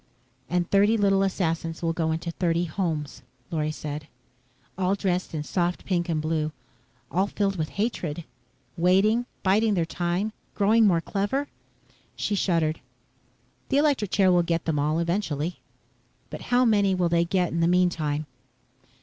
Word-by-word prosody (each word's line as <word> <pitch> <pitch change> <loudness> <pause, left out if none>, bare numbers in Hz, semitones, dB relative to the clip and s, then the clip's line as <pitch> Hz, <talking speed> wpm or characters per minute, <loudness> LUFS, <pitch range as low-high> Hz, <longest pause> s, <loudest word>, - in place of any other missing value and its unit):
"And 175 0 0
thirty 205 +3 +4
little 195 -2 +3
assassins 165 -4 -1
will 165 0 +1
go 160 -1 0
into 165 +1 -3
thirty 170 0 0
homes," 155 -4 -3 0.3
Lorry 155 -2 0
said. 150 -1 -6 0.7
"All 190 +1 +1
dressed 185 -4 -1
in 150 - -2
soft 175 +2 -1
pink 175 -2 -1
and 160 -2 0
blue, 155 0 -1 0.6
all 190 +4 +1
filled 200 -1 -1
with 155 -3 -2
hatred. 175 -7 -2 0.5
Waiting, 195 +7 +3 0.2
biding 210 +3 +3
their 170 -3 +1
time, 175 +5 -2 0.2
growing 215 +2 +4
more 170 -4 +3
clever." 205 +11 -2 0.7
She 210 - -2
shuddered. 165 -5 +1 0.9
"The 275 - +2
electric 285 -9 +2
chair 190 -2 +3
will 175 -1 +5
get 170 -1 -1
them 155 -3 0
all, 150 +2 +1
eventually." 170 -2 -1 0.7
"But - - -6
how 250 +1 +4
many 200 -4 +3
will 180 -1 +1
they 170 0 +3
get 180 0 0
in 170 - -1
the 165 - +3
meantime?" 165 -4 +1
175 Hz, 150 wpm, -26 LUFS, 165-200 Hz, 0.9 s, will